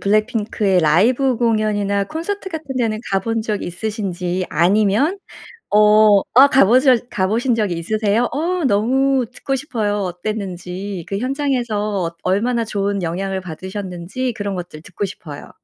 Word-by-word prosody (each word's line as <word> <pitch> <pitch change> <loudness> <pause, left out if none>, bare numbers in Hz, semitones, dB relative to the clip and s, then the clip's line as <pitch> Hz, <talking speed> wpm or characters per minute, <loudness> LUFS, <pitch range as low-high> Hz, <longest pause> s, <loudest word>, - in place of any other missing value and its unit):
블랙핑크의 210 -2 +1
라이브 235 - +3
공연이나 210 -3 +1
콘서트 380 - -5
같은 300 -6 -6
데는 225 -3 0
가 195 -1 +2
본 225 +3 -1
적 215 -2 -3
있으신지 185 -1 -3
아니면 210 - +2 0.5
어 210 -1 +6
아 270 +3 +8
가 270 -6 +5
보셨 250 +2 +3
가 185 -1 0
보신 235 +4 +1
적 210 -4 0
있으세요? 210 +7 0
어 340 +2 -1
너무 260 +4 +2
듣고 270 - -3
싶어요 220 -7 -2
어땠는지. 185 -1 -5
그 195 - -3
현장에서 240 - -1
어 170 - -7
얼마나 230 +5 +1
좋은 200 -2 -2
영향을 190 +3 -3
받으셨는지 185 +6 -5
그런 205 -3 -3
것들 175 -4 -7
듣고 200 - -5
싶어요. 155 -6 -8
210 Hz, 315 characters per minute, -19 LUFS, 190-245 Hz, 0.5 s, 아